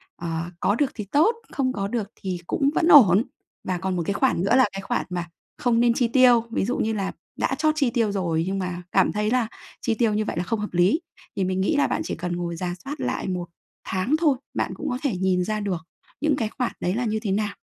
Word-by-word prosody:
ờ, 170 0 -4
có 200 - +2
được 275 +2 +1
thì 210 - -5
tốt, 330 +11 +4 0.2
không 260 -3 0
có 200 -3 -2
được 215 -1 -2
thì 185 -2 -4
cũng 275 - +1
vẫn 330 - +2
ổn. 220 - +8 0.4
Và 185 -1 -2
còn 190 +1 -2
một 175 - -1
cái 200 - 0
khoản 225 -5 +1
nữa 200 +5 +3
là 260 -1 +6
cái 195 - -4
khoản 195 - -2
mà 175 -1 -3 0.3
không 235 -2 +2
nên 240 0 +4
chi 240 0 +1
tiêu, 245 -1 +5
ví 210 - 0
dụ 245 - -1
như 220 - 0
là 195 -2 -2 0.3
đã 270 - +1
trót 310 +1 +2
chi 275 -5 +3
tiêu 230 -4 +1
rồi 170 -5 0
nhưng 195 +1 -1
mà 180 -1 -3
cảm - - +3
thấy 210 +1 -1
là 250 -2 +2 0.3
chi 230 - 0
tiêu 220 -1 +2
như 215 +1 0
vậy - - -4
là 175 - 0
không 225 +5 -2
hợp 210 -2 -5
lý 180 - +3 0.3
thì 195 - 0
mình 185 0 0
nghĩ 250 +11 +1
là 285 - +3
bạn - - -1
chỉ - - -3
cần 175 +1 -3
ngồi 175 -1 -3
rà 175 +1 -3
soát 285 +2 -5
lại - - -2
1 180 -2 -2 0.4
tháng 190 +10 +1
thôi, 300 -6 +3 0.2
bạn - - -1
cũng 300 - -4
có 250 - -1
thể 265 -9 0
nhìn 185 -1 +1
ra 215 +3 -2
được 195 -5 -2 0.4
những 300 -1 +2
cái 225 -5 -1
khoản 250 - 0
đấy 180 - 0
là 245 +2 -1
như 220 -1 0
thế 210 -4 -2
nào. 205 +1 -1
210 Hz, 260 wpm, -24 LUFS, 185-250 Hz, 0.4 s, ổn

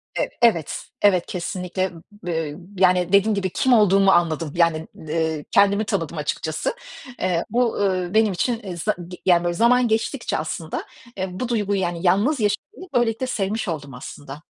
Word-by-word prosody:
ev - - 0
evet, 195 -11 +2 0.2
evet 185 -4 +4
kesinlikle. 180 +1 -3 0.2
B 165 -7 -4
ııı, 170 - -11 0.2
yani 180 0 +3
dediğim 200 +2 +5
gibi, 190 -2 -1
kim 255 +7 +2
olduğumu 195 -3 +5
anladım. 165 -4 +1
Yani, 165 -2 +2
ııı, 160 -1 -2
kendimi 200 +1 +4
tanıdım 165 -4 -2
açıkçası. 155 - -2 0.5
Eee, 180 -2 0
ol 245 -1 +2
ııı, 185 -2 -1
benim 220 -2 +3
için 210 -1 -2
za 190 +6 -1
g 180 - -9
yani 175 -2 +4
böyle 175 0 0
zaman 240 +5 +4
geçtikçe 225 +3 -1
aslında, 160 +1 -4 0.3
eee, 190 - -2
bu 250 - -2
duyguyu, 205 -4 0
yani 175 -1 -2
yalnız 205 - +3
yaşamayı 360 - -3
böylelikle 240 +1 +1
sevmiş 215 -2 -2
oldum 145 -5 -4
aslında. 135 +3 -9
185 Hz, 160 wpm, -22 LUFS, 170-215 Hz, 0.5 s, dediğim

